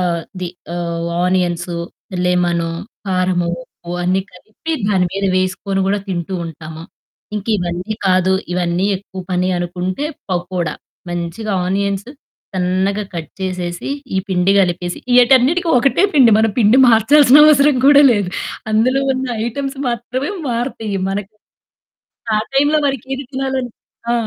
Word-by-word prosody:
ఆహ్, 170 -1 -3 0.2
ది 180 - -3 0.3
ఆహ్, 170 -1 -3 0.2
onions, 180 -1 0 0.5
lemon, 175 -2 +1 0.4
కారము, 185 -2 +1
ఉప్పు 170 0 -14
అన్నీ 185 +2 +1
కలిపి 215 - -7 0.2
దాని 190 -3 +2
మీద 195 +1 -2
వేసుకొని 185 +1 -1
కూడా 200 +1 +1
తింటూ 180 0 -3
ఉంటాము. 160 0 -9 0.5
ఇంకా 210 +1 -4
ఇవన్నీ 180 +4 -3
కాదు. 185 0 +3 0.2
ఇవన్నీ 175 +1 0
ఎక్కువ 190 -1 -9
పని 180 0 +1
అనుకుంటే, 180 +7 -3 0.3
పకోడా 180 -1 -2 0.4
మంచిగా 175 +5 -4
ఆనియన్స్ 200 +2 -1 0.5
సన్నగా 190 +3 0
కట్ 165 -2 -5
చేసేసి, 180 -2 -4 0.3
ఈ - - +3
పిండి 185 0 +2
కలిపేసి 175 -2 0 0.2
ఈటన్నిటికి 260 +8 +4
ఒకటే 275 +8 +2
పిండి. 260 -5 +6
మన 220 - +4
పిండి 220 +1 +5
మార్చాల్సిన 260 +5 +6
అవసరం 290 -2 +5
కూడా 285 0 +8
లేదు. 205 -4 0 0.4
అందులో 245 +5 +2
ఉన్న 260 0 -2 0.2
ఐటెమ్స్ 275 +3 -4
మాత్రమే 250 - -3 0.2
మారుతాయి 230 -4 -2
మనకి. 200 +2 -4 1.0
ఆ - - +3 0.2
టైంలో 290 +3 +3
మనకి 270 -4 -2
ఏది 275 +1 -6
తినాలని 265 -2 -2 0.4
ఆ! - - +3
195 Hz, 130 wpm, -17 LUFS, 180-245 Hz, 1.0 s, కూడా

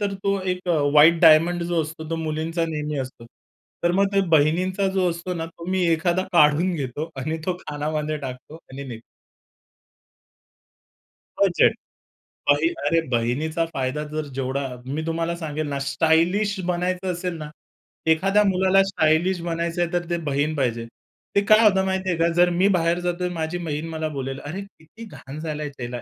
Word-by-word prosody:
तर 200 -1 -1
तो 200 0 +1
एक 180 -1 -3
अ, 165 -3 +3
व्हाईट 160 +3 +6
डायमंड 165 +2 +6
जो 170 -1 0
असतो 160 0 -8
तो 165 - -1
मुलींचा 160 +1 -2
नेहमी 150 -2 -3
असतो. 130 -3 -6 0.6
तर 175 - +3
मग 195 +2 +3
ते 195 - +5
बहिणींचा 175 +5 +2
जो 185 -2 +2
असतो 170 +2 -4
ना, 165 -1 -4
तो 165 +1 -12
मी 185 -1 +1
एखादा 170 +2 +1
काढून 170 +2 +4
घेतो 145 +1 -4
आणि 155 +5 -3
तो 185 - +2
कानामध्ये 150 0 -3
टाकतो 135 +1 -8 0.2
आणि 140 +1 -7
निघतो. 115 -4 -8 2.4
बजेट. - - +4 0.8
बही 145 +3 +4 0.2
अरे, 165 +3 +3
बहिणीचा 135 +8 0
फायदा 135 +3 -2
जर 155 0 -2
जेवढा 135 +1 -2 0.2
मी 140 +4 -3
तुम्हाला 165 +1 -1
सांगेल 155 -2 -4
ना, 140 -1 -2
स्टायलिश 165 +8 +1
बनायचं 180 +1 -1
असेल 180 0 -3
ना, 150 -1 -7 0.6
एखाद्या 195 +6 +3
मुलाला 190 0 +4
स्टायलिश 180 -1 +1
बनायचंय, 170 +1 -1
तर 175 -1 -1
ते 175 - 0
बहीण 145 +3 0
पाहिजे. 120 -5 -1 0.5
ते 200 - +5
काय 215 0 +8
होतं 190 -3 +4
माहिती 190 0 -1
आहे 175 - 0
का, 165 - +4
जर 175 +1 +4
मी 180 +3 +2
बाहेर 170 0 +1
जातोय, 180 0 -2
तर - - -6
माझी 160 +1 -3
बहीण 160 -2 -4
मला 160 -1 -3
बोलेल, 135 0 -4
"अरे, 170 +7 -6
किती 200 +2 -13
घाण 145 -8 -10
झालाय 150 -2 -4
त्याला 120 -1 -5
165 Hz, 170 wpm, -23 LUFS, 150-180 Hz, 2.4 s, काय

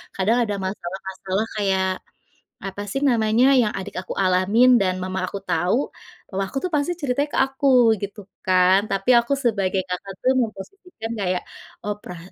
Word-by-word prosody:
Kadang 210 +5 +2
ada 205 - -2
masalah-masalah 190 +2 -4
kayak, 190 -2 +1 0.8
apa 195 +1 -5
sih 270 - -2
namanya 225 +1 +3
yang 220 - +2
adik 190 - -7
aku 185 - -7
alamin 185 +7 +4
dan 185 -2 +1
mama 185 0 -3
aku 200 - -5
tahu, 175 +6 +1 0.6
mama 195 +1 -1
aku - - -12
itu 365 - -2
pasti 290 +4 0
ceritanya 285 +1 0
ke - - 0
aku 270 +1 -3 0.4
gitu 200 +1 -5 0.2
kan, 185 0 +5
tapi 195 +6 0
aku 235 +3 -1
sebagai 195 -5 +1
kakak 180 +2 -5
itu - - -12
memposisikan 230 - -6
kayak 180 -2 -1 0.4
oh 210 - -1
pera 180 - -9
195 Hz, 160 wpm, -22 LUFS, 185-235 Hz, 0.8 s, kan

